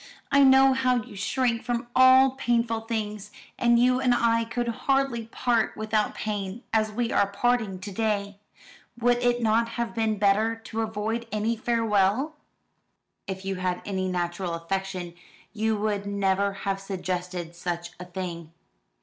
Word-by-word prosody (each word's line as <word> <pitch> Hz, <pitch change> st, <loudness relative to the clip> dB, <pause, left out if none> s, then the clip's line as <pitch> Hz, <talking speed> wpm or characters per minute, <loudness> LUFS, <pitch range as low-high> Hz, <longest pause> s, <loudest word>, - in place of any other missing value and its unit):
I 280 Hz, 0 st, +6 dB
know 265 Hz, 0 st, +6 dB
how 255 Hz, -2 st, +1 dB
you 205 Hz, -, -12 dB
shrink 230 Hz, +3 st, 0 dB
from 240 Hz, -1 st, -2 dB
all 260 Hz, +1 st, +7 dB
painful 235 Hz, -3 st, 0 dB
things; 210 Hz, -2 st, -3 dB, 0.3 s
and 235 Hz, -1 st, +4 dB
you 250 Hz, +1 st, +4 dB
and 250 Hz, -2 st, +3 dB
I 230 Hz, -1 st, +2 dB
could 240 Hz, +1 st, -3 dB
hardly 265 Hz, -1 st, 0 dB
part 235 Hz, -1 st, 0 dB
without 215 Hz, -1 st, 0 dB
pain, 205 Hz, +1 st, -4 dB
as 215 Hz, -1 st, +2 dB
we 235 Hz, +2 st, -1 dB
are 200 Hz, -, +3 dB
parting 220 Hz, -2 st, 0 dB
to 200 Hz, +2 st, -8 dB
day. 200 Hz, -1 st, -2 dB, 0.6 s
Would 245 Hz, 0 st, +3 dB
it 245 Hz, -1 st, +1 dB
not 230 Hz, +1 st, +2 dB
have 235 Hz, -1 st, -2 dB
been 220 Hz, -2 st, 0 dB
better 210 Hz, +3 st, +2 dB
to 225 Hz, 0 st, -5 dB
avoid 220 Hz, +2 st, -3 dB
any 215 Hz, +2 st, 0 dB
farewell?" 225 Hz, +4 st, +1 dB, 0.9 s
"If 190 Hz, 0 st, -5 dB
you 195 Hz, -1 st, -2 dB
had 180 Hz, -1 st, -2 dB
any 190 Hz, -2 st, -2 dB
natural 175 Hz, -1 st, -2 dB
affection, 185 Hz, 0 st, -4 dB, 0.4 s
you 220 Hz, 0 st, 0 dB
would 205 Hz, -1 st, -2 dB
never 200 Hz, 0 st, +1 dB
have 195 Hz, 0 st, -1 dB
suggested 180 Hz, -3 st, -4 dB
such 175 Hz, -1 st, -4 dB
a 180 Hz, -, -7 dB
thing." 175 Hz, -3 st, -6 dB
215 Hz, 150 wpm, -26 LUFS, 195-235 Hz, 0.9 s, all